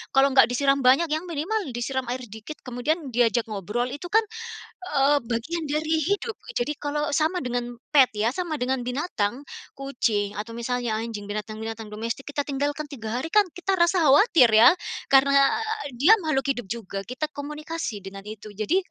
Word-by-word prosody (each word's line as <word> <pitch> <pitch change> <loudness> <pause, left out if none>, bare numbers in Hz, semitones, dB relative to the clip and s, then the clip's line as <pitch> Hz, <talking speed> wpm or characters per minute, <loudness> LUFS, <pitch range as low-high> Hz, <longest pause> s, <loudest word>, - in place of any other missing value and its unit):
kalau 270 +1 +5
enggak 260 -3 +6
disiram 275 +3 +2
banyak 275 +5 +4
yang 315 +4 -1
minimal 345 +7 -1 0.2
disiram 255 +1 -2
air 250 +1 -3
dikit 220 +7 -9
kemudian 270 +4 -2
diajak 235 -1 +2
ngobrol 215 +5 -2
itu 290 +6 -6
kan, 440 +4 +3 0.7
eee, 280 +1 +4
bagian 245 +9 -2
dari 310 +2 0
hidup. 410 +3 -1 0.2
Jadi 270 +5 0
kalau 295 0 -2
sama 315 +4 +1
dengan 245 -1 -3 0.2
pet 275 -6 +5
ya, 215 +2 +1
sama 345 +1 -3
dengan 260 +1 0
binatang, 250 - -2 0.3
kucing, 220 -7 -1
atau 220 +2 -5
misalnya 235 -1 -2
anjing, 220 -3 -6
binatang-binatang 215 +1 -5
domestik, 230 +6 -5
kita 285 0 -2
tinggalkan 285 +1 -2
3 240 -4 -5
hari 265 - -3
kan 420 - +7
kita 360 +3 -2
rasa 345 -2 +3
khawatir 285 - +6
ya, 225 +3 +9 0.4
karena 275 +1 +5 0.2
a 440 -7 -4
dia 345 +11 +7
makhluk 270 -4 0
hidup 245 -5 -2
juga, 210 -4 -5
kita 250 +8 -4
komunikasi 300 -4 -5
dengan 195 0 -8
itu 210 0 -10
jadi, 215 - 0
270 Hz, 170 wpm, -25 LUFS, 230-305 Hz, 0.7 s, ya